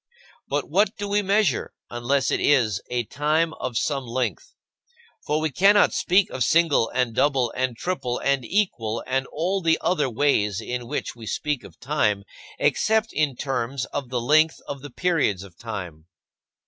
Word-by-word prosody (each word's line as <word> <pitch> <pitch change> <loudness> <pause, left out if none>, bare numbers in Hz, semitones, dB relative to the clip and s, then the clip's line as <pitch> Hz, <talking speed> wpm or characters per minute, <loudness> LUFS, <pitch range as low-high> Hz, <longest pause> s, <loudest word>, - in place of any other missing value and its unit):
But - - -1
what 205 +2 +2
do 205 -1 -4
we 205 +1 +2
measure, 200 - +1 0.2
unless 125 +3 0
it - - +1
is 115 -9 +2
a 125 -1 0
time 155 +7 0
of 125 -3 -3
some 135 -2 -1
length? 130 - -3 0.7
For 150 +1 +1
we 155 -1 -1
cannot 200 +7 +5
speak 185 +2 +3
of 130 - -1
single, 160 -7 +3
and 125 -2 0
double, 130 -2 +1
and 130 -2 -1
triple, 135 -8 -2
and 140 -2 0
equal, 115 - -1
and 135 +1 -1
all 185 +5 -1
the 165 -2 +3
other 160 -7 +1
ways 110 -6 +1
in 120 +1 -5
which - - -4
we 115 -2 -10
speak 150 0 -2
of - - -14
time, 105 -8 0 0.3
except 220 0 +1
in 150 -4 +1
terms 130 0 -2
of 135 -4 -3
the 125 -1 -1
length 155 +6 +3
of 140 -1 -6
the 145 - -8
periods 140 - 0
of 95 -4 -14
time. 90 -9 -7
135 Hz, 170 wpm, -24 LUFS, 120-165 Hz, 0.7 s, cannot